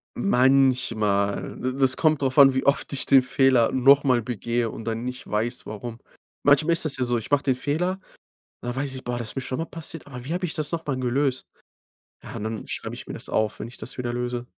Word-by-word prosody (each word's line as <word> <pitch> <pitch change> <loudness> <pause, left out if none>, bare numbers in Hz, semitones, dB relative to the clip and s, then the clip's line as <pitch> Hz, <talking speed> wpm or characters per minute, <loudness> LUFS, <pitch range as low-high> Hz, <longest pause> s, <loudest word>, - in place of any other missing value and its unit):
Manchmal, 125 - +2
d 130 +1 -3
das 130 -1 +4
kommt 155 -2 +2
drauf 130 0 -1
an, 135 -1 +8
wie 130 - -1
oft 140 - +2
ich 140 - 0
den 135 -1 +6
Fehler 130 -2 +3
noch 135 +2 +5
mal 130 -4 +3
begehe 120 0 -2
und 110 - -8
dann 115 0 -3
nicht 125 +1 -6
weiß, 115 +4 -2
warum. 115 +2 -7 0.4
Manchmal 145 +4 +4
ist 165 - -3
das 150 - -2
ja 130 - 0
so, 120 -1 0
ich 115 - -6
mach 145 -1 +3
den 130 -2 +2
Fehler, 175 +8 -1 0.6
und - - -7
dann 120 - -4
weiß 135 0 -2
ich: 130 - -7
„Boah, 120 0 -3
das 115 -2 -4
ist - - -6
mir 135 - -2
schon 130 0 -4
mal 165 - -2
passiert, 165 -1 -9
aber 125 -3 -8
wie 145 +6 -4
hab 180 +1 -3
ich 175 - -2
das 155 -2 -2
noch 165 -1 -3
mal 135 -3 -2
gelöst?“ 130 +1 0 0.8
Ja, - - -9
und - - -5
dann 110 0 -5
schreib - - -5
ich - - -9
mir - - -6
das - - -8
auf, 110 -1 0
wenn - - -5
ich 120 - -12
das 110 - -8
wieder 120 -1 -3
löse. 120 0 -3
130 Hz, 245 wpm, -24 LUFS, 120-140 Hz, 0.8 s, an